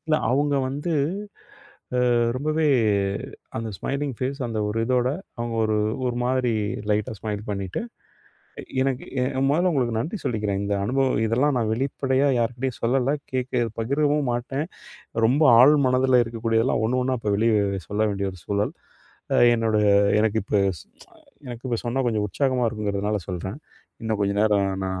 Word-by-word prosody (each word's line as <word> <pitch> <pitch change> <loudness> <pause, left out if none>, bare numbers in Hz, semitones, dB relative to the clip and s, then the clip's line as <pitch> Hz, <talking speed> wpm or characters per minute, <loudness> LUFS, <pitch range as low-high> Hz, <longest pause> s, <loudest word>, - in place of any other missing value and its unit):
இல்லை 155 0 +3
அவங்க 145 +2 +2
வந்து, 145 +5 -4 1.2
அ - - +4 0.2
ரொம்பவே 155 +3 0 0.9
அந்த 115 0 -4
ஸ்மைலிங் 140 0 -2
ஃபேஸ் 135 +2 -3
அந்த 110 -2 -3
ஒரு 110 +2 -2
இதோட, 125 0 +2 0.3
அவங்க 120 0 -3
ஒரு 110 0 +1 0.3
ஒரு 120 -1 -1
மாதிரி 125 -1 +1 0.4
லைட்டா 105 +1 0
ஸ்மைல் 105 -1 -4
பண்ணிட்டு, 100 - -3 1.0
எனக்கு 135 -1 -1 0.2
எ - - +2 0.3
மொதல்ல 175 +5 +2
உங்களுக்கு 120 -5 0
நன்றி 165 - -3
சொல்லிக்கிறேன். 105 -4 -1
இந்த 100 0 -1
அனுபவம் 130 +1 +1
இதெல்லாம் 130 +5 +2
நான் 110 -2 0
வெளிப்படையா 135 +2 0
யார்க்கிட்டயும் 120 +2 -2
சொல்லலை, 130 +3 +2 0.2
கேட்க 125 -1 0 0.2
பகிரவும் 145 +3 +1
மாட்டேன். 135 +5 -2 0.6
ரொம்ப 135 +7 +2 0.2
ஆழ் 145 +4 +8
மனதில 130 0 +4
இருக்கக்கூடியதெல்லாம், 115 0 0
ஒண்ணு 125 +2 +1
ஒண்ணா, 130 0 0
இப்போ 105 -2 -1
வெளிய 115 +1 +2 0.4
சொல்ல 105 +1 -2
வேண்டிய 100 -1 -2
ஒரு 90 - -13
சூழல். 100 +1 -1 0.6
அ - - +4 0.2
என்னோடய 110 -2 +1 0.3
எனக்கு 110 0 +1
இப்போ, 105 - +1 0.9
எனக்கு 120 0 -8
இப்போ 120 -2 0
சொன்னா 130 +3 0
கொஞ்சம் 105 -2 0
உற்சாகமா 130 +1 0
இருக்குங்கிறதுனால, 105 -1 -2
சொல்றேன். 95 - -5 0.4
இன்னும் 110 -2 -2
கொஞ்சம் 100 +1 +1
நேரம் 105 -2 +3 0.2
நான் 95 0 -3
120 Hz, 145 wpm, -24 LUFS, 105-135 Hz, 1.2 s, ஆழ்